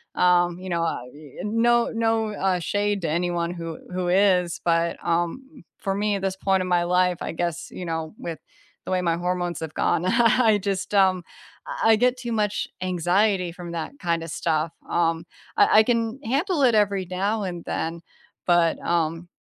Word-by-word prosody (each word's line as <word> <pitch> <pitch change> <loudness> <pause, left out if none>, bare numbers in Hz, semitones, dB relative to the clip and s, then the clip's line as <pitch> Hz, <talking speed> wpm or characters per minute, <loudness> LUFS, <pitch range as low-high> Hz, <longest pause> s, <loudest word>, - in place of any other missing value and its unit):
um, 175 -1 +3
you 185 0 -7
know, 170 -1 0
uh, 125 -7 -2
e 145 -2 -14
and 210 +2 -3
no 235 0 +3
no, 225 -1 +1
uh, 190 -3 0
shade 205 +3 -1
to 160 - 0
anyone 170 +1 -1
who 165 -2 -6 0.2
who 180 -1 -2
is, 180 -2 +3
but, 170 0 +1
um, 210 - -2
for 195 -2 -2
me 205 +1 0
at 195 - -3
this 190 -1 -1
point 190 0 +1
in 185 - -3
my 175 -1 +2
life, 180 0 +2
I - - -3
guess, 170 0 -3
you 180 - -7
know, 160 +1 -4
with 165 -2 -6 0.5
the - - -5
way 185 - +1
my 170 -2 +1
hormones 175 0 -2
have 160 -1 -6
gone, 175 - +1
I 235 +3 +4
I - - +3
just, 195 0 -3
um, 190 -2 +4 0.6
I 225 -1 +6
get 250 +2 +2
too 245 -2 -5
much 210 -2 0
anxiety 185 +1 +1
from 175 0 -8
that 165 -2 -4
kinda 170 -2 -1
stuff, 160 0 -1 0.2
um, 165 -1 +1 0.3
I - - +6
I - - +7
can 230 +1 0
handle 285 - 0
it 240 -3 +5
every 200 -3 +2
now 200 +4 -1
and 175 -3 -5
then, 165 +1 -3 0.5
but, 175 -2 +3
um 165 0 -1
180 Hz, 190 wpm, -24 LUFS, 170-210 Hz, 0.6 s, I